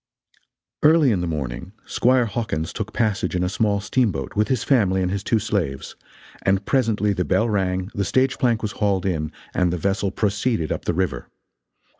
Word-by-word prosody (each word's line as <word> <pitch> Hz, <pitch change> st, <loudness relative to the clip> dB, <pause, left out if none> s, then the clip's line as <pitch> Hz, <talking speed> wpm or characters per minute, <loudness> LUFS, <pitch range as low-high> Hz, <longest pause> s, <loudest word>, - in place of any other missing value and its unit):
Early 150 Hz, -3 st, +5 dB
in 95 Hz, -5 st, 0 dB
the 90 Hz, -, -2 dB
morning 75 Hz, +3 st, -4 dB
Squire 125 Hz, 0 st, +2 dB
Hawkins 105 Hz, -9 st, -3 dB
took 110 Hz, 0 st, -4 dB
passage 110 Hz, -4 st, 0 dB
in 90 Hz, -, +1 dB
a -, -, +1 dB
small 100 Hz, +1 st, +1 dB
steamboat, 105 Hz, -, -1 dB
with 105 Hz, +1 st, +2 dB
his 130 Hz, -4 st, 0 dB
family 95 Hz, -8 st, +2 dB
and 90 Hz, -, -1 dB
his 100 Hz, 0 st, -2 dB
two 115 Hz, -, +2 dB
slaves, 95 Hz, -11 st, -2 dB, 0.5 s
and 95 Hz, +1 st, +1 dB
presently 110 Hz, -6 st, +1 dB
the 90 Hz, -, -1 dB
bell 110 Hz, -, +1 dB
rang, 95 Hz, -2 st, -1 dB
the 100 Hz, -, -1 dB
stage 130 Hz, +7 st, +1 dB
plank 120 Hz, -5 st, +1 dB
was 105 Hz, -, -1 dB
hauled 100 Hz, -5 st, 0 dB
in, 80 Hz, -5 st, -1 dB, 0.2 s
and 90 Hz, -1 st, +1 dB
the 90 Hz, -, -1 dB
vessel 100 Hz, +2 st, 0 dB
proceeded 100 Hz, -, -1 dB
up -, -, -3 dB
the 85 Hz, -, 0 dB
river. 95 Hz, +1 st, -2 dB
100 Hz, 185 wpm, -22 LUFS, 90-115 Hz, 0.5 s, Early